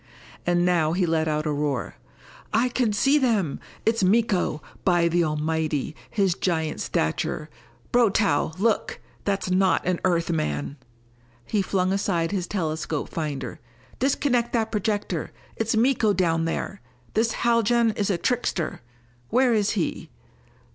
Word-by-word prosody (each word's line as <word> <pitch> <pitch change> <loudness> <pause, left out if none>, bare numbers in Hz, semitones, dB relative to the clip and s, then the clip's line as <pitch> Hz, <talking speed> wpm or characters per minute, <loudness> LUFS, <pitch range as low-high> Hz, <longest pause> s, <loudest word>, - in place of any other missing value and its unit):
And 175 0 +3
now 165 -3 +2
he 180 +1 +2
let 160 -1 +1
out 155 0 0
a 150 - 0
roar. 145 -4 -1 0.6
"I 235 +3 +2
can 245 -3 +1
see 275 +8 +3
them! 215 - +1 0.3
It's 225 -2 +2
Miko! 195 -5 +2 0.2
By 175 -2 +3
the 170 +1 +2
Almighty 155 -1 -1
his 195 -4 +2
giant 160 -4 -1
stature 150 - -1 0.4
Brotow, 200 -9 +2
look! 215 +2 0 0.3
That's 195 -2 -1
not 185 0 +3
an 180 -1 0
Earth 170 -2 +1
man!" 75 - -2 0.7
He 210 - 0
flung 190 -1 0
aside 180 -4 0
his 185 -3 -2
telescope 160 -5 -2
finder. 150 -4 -4 0.4
"Disconnect 250 -2 +1
that 225 -2 0
projector! 210 -1 -1 0.2
It's 225 0 0
Miko 230 -3 +3
down 165 -4 +1
there! 190 +4 -3 0.3
This 225 +1 +2
Haljan 235 0 +3
is 205 -1 -1
a 190 - +1
trickster! 190 - -1 0.5
Where 250 0 +3
is 210 -2 +2
he? - - -2
185 Hz, 135 wpm, -25 LUFS, 160-225 Hz, 0.7 s, And